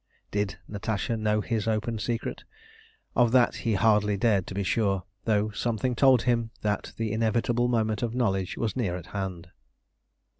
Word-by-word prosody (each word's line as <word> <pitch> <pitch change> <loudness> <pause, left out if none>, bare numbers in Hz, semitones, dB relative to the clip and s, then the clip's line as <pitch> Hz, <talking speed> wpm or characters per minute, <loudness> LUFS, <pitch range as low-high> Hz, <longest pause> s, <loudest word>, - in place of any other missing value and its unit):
Did 105 0 -1
Natasha 105 +3 -2
know 105 -1 +1
his 115 0 -2
open 110 +1 -1
secret? 115 +2 -3 0.7
Of 120 -2 +4
that 125 -2 +4
he 115 -3 0
hardly 105 -1 +3
dared 100 -4 +2
to 95 - -6
be 100 - 0
sure, 95 -2 +1 0.2
though 110 -1 +2
something 115 +3 -1
told 130 -1 +5
him 115 -2 +1
that 105 -1 -1
the 115 -2 -1
inevitable 115 +2 +1
moment 110 -3 0
of 120 -1 -2
knowledge 95 -7 0
was 115 -2 -1
near 105 -9 -1
at 85 - -9
hand. 95 -3 -4
110 Hz, 160 wpm, -27 LUFS, 100-115 Hz, 0.7 s, told